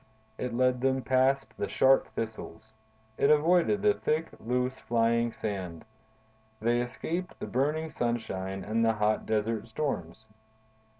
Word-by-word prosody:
It 125 - -2
led 125 0 +2
them 130 0 +1
past 130 +1 +2
the - - -2
sharp 135 0 +4
thistles, 110 -2 -6 0.5
it 140 - +4
avoided 175 +7 +3
the 210 -1 +5
thick, 160 -3 -1
loose, 125 +2 -1
flying 115 0 +1
sand; 95 -7 -5 0.7
they 120 +2 +2
escaped 170 +9 -4
the - - -4
burning 150 +5 -1
sunshine 95 -5 -2
and 115 +2 0
the 115 0 +3
hot 105 0 0
desert 110 0 -1
storms. 110 - -4
120 Hz, 130 wpm, -29 LUFS, 110-135 Hz, 0.7 s, the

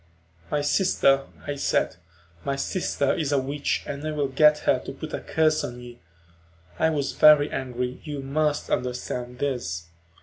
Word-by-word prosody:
"My 145 - 0
sister," 140 -4 +3 0.2
I 145 - -2
said. 140 -9 0 0.5
"My 140 - -1
sister 140 -1 0
is 150 -4 -1
a 145 - +3
witch 140 +2 -1
and 145 0 -5
I - - -1
will 145 -2 -1
get 150 +3 +5
her - - +3
to - - -7
put - - -8
a - - -2
curse 155 -1 +1
on 120 0 -5
you." 120 -1 -11 0.8
I 160 - +4
was 145 -3 -1
very 150 -1 +6
angry, 125 -1 -3
you 145 -3 -5
must 150 +2 -1
understand 125 0 -3
this. 120 -12 -2
140 Hz, 165 wpm, -25 LUFS, 125-150 Hz, 0.8 s, very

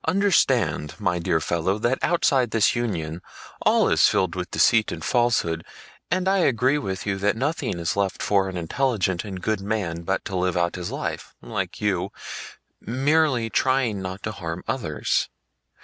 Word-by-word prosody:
"Understand, 130 - +2
my 90 0 0
dear 85 -1 +1
fellow, 85 +5 0
that 120 +4 0
outside 135 -7 +2
this 110 +1 +3
union 90 -9 -2 0.4
all - - +4
is - - +5
filled 95 -2 +1
with 90 -1 -4
deceit 110 +7 +3
and - - -5
falsehood 115 -10 +1 0.5
and 185 +2 0
I 195 0 +3
agree 135 -2 +2
with 95 -6 -4
you 100 -2 -1
that 105 +2 +1
nothing 145 - -1
is 85 - -1
left 100 -1 -1
for 100 -2 +2
an 90 - -5
intelligent 95 0 0
and 95 -3 -6
good 110 +2 -1
man 95 -5 -2
but 95 +3 -2
to 95 - -4
live 90 -1 0
out 85 0 +1
his 90 -1 -5
life, - - -5
like - - -4
you, 95 -4 0 0.7
merely 135 0 +1
trying 130 -6 +1
not 95 +1 -6
to 110 - -2
harm 85 -4 -6
others. 80 - -1
100 Hz, 165 wpm, -24 LUFS, 90-125 Hz, 0.7 s, is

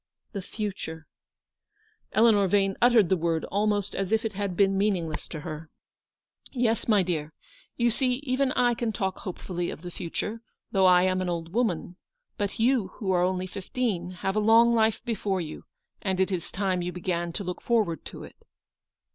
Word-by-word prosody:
" - - -51
The 200 - -3
future! 185 -6 -5 0.6
" 435 +1 -41
Eleanor 215 -3 +5
Vane 195 0 +2
uttered 235 -7 +5
the 190 - +4
word 165 -2 0
almost 205 0 +1
as 195 0 -2
if 225 +1 +2
it 220 - -2
had 195 -2 -3
been 195 -1 +4
meaningless 185 -6 0
to 155 - -6
her. 155 +1 -7 0.4
" - - -62
Yes, 235 -4 0
my 210 -4 +4
dear. 160 -3 -3 0.4
You 235 0 +3
see 250 +2 +1
even 260 0 +1
I 245 -1 +3
can 230 -1 -1
talk 190 -2 -2
hope 185 - -6
fully 175 -2 -3
of 160 - -8
the 175 - -6
future, 210 +7 -4 0.3
though 190 -2 +4
I 180 0 +6
am 185 0 +1
an 185 - -1
old 170 0 -4
woman; 185 -6 -1 0.4
but 205 -1 -2
you, 235 -3 +3
who 195 -4 -1
are 180 -1 +3
only 185 0 0
fifteen, 190 -1 -2 0.2
have 195 +1 +1
a - - +3
long 225 +2 +6
life 220 -1 +2
before 205 -4 -1
you, 155 -3 -6 0.4
and 190 -2 -1
it 190 +1 +2
is 175 -3 -3
time 190 -2 0
you 175 +1 -2
began 175 -1 -2
to 200 - -3
look 180 -1 -5
forward 215 -9 +1
to - - -8
it." - - -12
195 Hz, 195 wpm, -27 LUFS, 180-225 Hz, 0.6 s, I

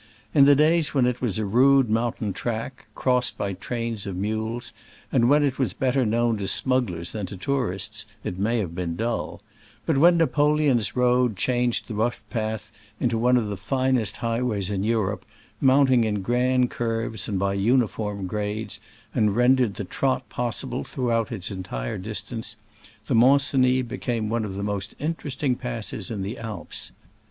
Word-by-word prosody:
In 140 -2 +7
the 140 0 +7
days 155 +1 +3
when 130 -3 +4
it 125 0 -1
was 115 -6 -1
a 110 - -1
rude 130 +5 +5
mountain 110 -2 -1
track, 120 +4 -4
crossed 125 -1 +1
by 100 -1 -2
trains 115 +1 -4
of 95 - -4
mules, 110 +4 -3 0.4
and 120 +1 +3
when 145 +1 +5
it 135 -2 0
was 110 -8 0
better 130 -2 +1
known 115 +1 +1
to 100 - -3
smugglers 105 -12 0
than 105 -4 -4
to 100 - -8
tourists, 105 -3 -2 0.2
it 90 - -4
may 115 +4 +1
have 95 -7 -2
been 85 -2 -3
dull; 115 -1 -3 0.4
but 155 -5 +2
when 170 +3 +6
Napoleon's 150 -7 +2
road 125 -3 +2
changed 125 +2 0
the 115 - -5
rough 110 +3 -1
path 110 -2 -3 0.3
into 120 -2 +1
one 125 +3 +3
30 120 - +3
of 105 - -4
the 100 - -4
finest 125 0 0
highways 115 -4 -1
in 95 -1 -1
Europe, 110 -3 0 0.4
mount 135 0 +4
ing 120 -2 +5
in 105 -3 -1
grand 125 +3 +2
curves 115 -1 -2
and 100 - -1
by 100 +1 0
uniform 105 -2 0
grades, 105 +3 -3 0.3
and 105 -2 +2
rendered 125 -3 +3
the 105 - -4
trot 130 +7 -1
possible 120 -11 -3
throughout 115 - -1
its 105 -2 -4
entire 75 -11 -4
distance, 110 +3 -5 0.5
the - - -1
Mont 135 +5 +6
Cenis 130 -2 +2
became 115 -2 -2
one 115 -1 0
of 95 -2 -6
the 100 - -4
most 100 -1 -3
interest 150 -2 -4
ing 130 -4 +2
passes 115 -5 -5
in 105 -4 -3
the 105 +6 -5
Alps. 110 -6 -7
115 Hz, 175 wpm, -25 LUFS, 105-125 Hz, 0.5 s, In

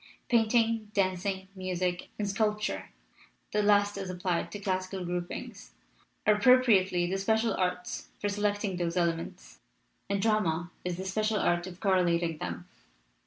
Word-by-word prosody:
Painting, 225 -2 +2
dancing, 190 0 0
music, 185 -1 -2
and 210 - -1
sculpture 200 - -1 0.6
(the 210 - +2
last 205 -1 +3
as 190 -1 -4
applied 180 -2 -1
to - - -5
classic 185 -1 -2
groupings) 175 0 -5 0.5
are 210 - +6
appropriately 210 -6 +4
the 190 +2 -1
special 220 +2 +2
arts 180 -1 -2
for 205 - -2
selecting 205 -1 -1
those 175 0 -1
elements, 165 - -2 0.5
and 200 0 +1
drama 180 -6 +1
is 180 -1 -2
the 190 - -5
special 215 +3 0
art 175 -2 +1
of 180 -1 -10
correlating 170 -5 +2
them. 85 -1 -5
190 Hz, 135 wpm, -29 LUFS, 175-210 Hz, 0.6 s, are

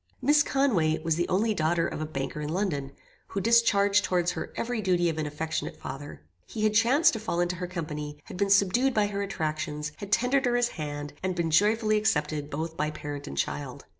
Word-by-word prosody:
"Miss 295 +1 +4
Conway 210 - +2
was 165 -1 +1
the 175 +1 -1
only 215 +4 +2
daughter 165 -1 +1
of - - -5
a 155 - -2
banker 135 0 -4
in 150 - -3
London, 160 -6 -2 0.4
who 195 - -3
discharged 205 -2 +4
towards 175 -1 +1
her - - -5
every 235 -1 -2
duty 175 -3 +2
of 160 -1 -3
an 155 - -1
affectionate 155 +1 -4
father. 140 +2 -8 0.2
He 215 - -4
had 215 -1 +3
chanced 245 +9 +4
to 225 - -3
fall 215 -5 -2
into 175 0 0
her 180 +1 -4
company, 150 -4 -5
had - - -10
been 200 +2 0
subdued 200 +7 +3
by 210 -1 +3
her 200 -1 -3
attractions, 155 -5 -3
had 200 -1 -8
tendered 255 +4 +2
her 245 -1 +2
his 245 0 +2
hand, 145 -2 -5
and 185 -1 -1
been 170 -2 -1
joyfully 215 +5 +3
accepted 150 -8 0
both 160 +3 -4
by 150 -1 -1
parent 145 -1 -6
and 70 - -7
child. 70 - -3
175 Hz, 210 wpm, -27 LUFS, 155-215 Hz, 0.4 s, Miss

